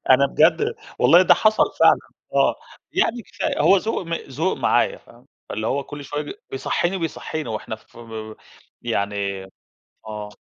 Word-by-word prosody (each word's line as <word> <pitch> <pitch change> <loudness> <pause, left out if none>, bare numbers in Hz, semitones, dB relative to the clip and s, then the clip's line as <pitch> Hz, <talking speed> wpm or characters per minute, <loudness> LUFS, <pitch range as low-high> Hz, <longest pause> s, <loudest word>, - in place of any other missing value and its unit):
أنا 135 +2 +6
بجد 160 +4 +3 0.2
والله، 160 +9 +7
ده - - +6
حصل 215 0 +4 0.2
فعلًا، - - +7 0.4
آه، - - +3 0.4
يعني 245 - +1
كفاية - - -3
هو 195 - +6
ذوق 220 +3 -1
م 165 - -2
ذوق 160 +4 -2
معايا، - - +2
فاهمة، - - -20 0.2
اللي 110 +1 -3
هو 140 +3 -1
كل 145 0 -8
شوية 145 +2 -4 0.2
بيصحيني 175 +7 -1
وبيصحينا 160 -5 -4
وإحنا 110 0 -4
ف 110 - -20 0.8
يعني، 100 0 -2 0.6
آه. 105 -1 -6
145 Hz, 145 wpm, -22 LUFS, 110-175 Hz, 0.8 s, والله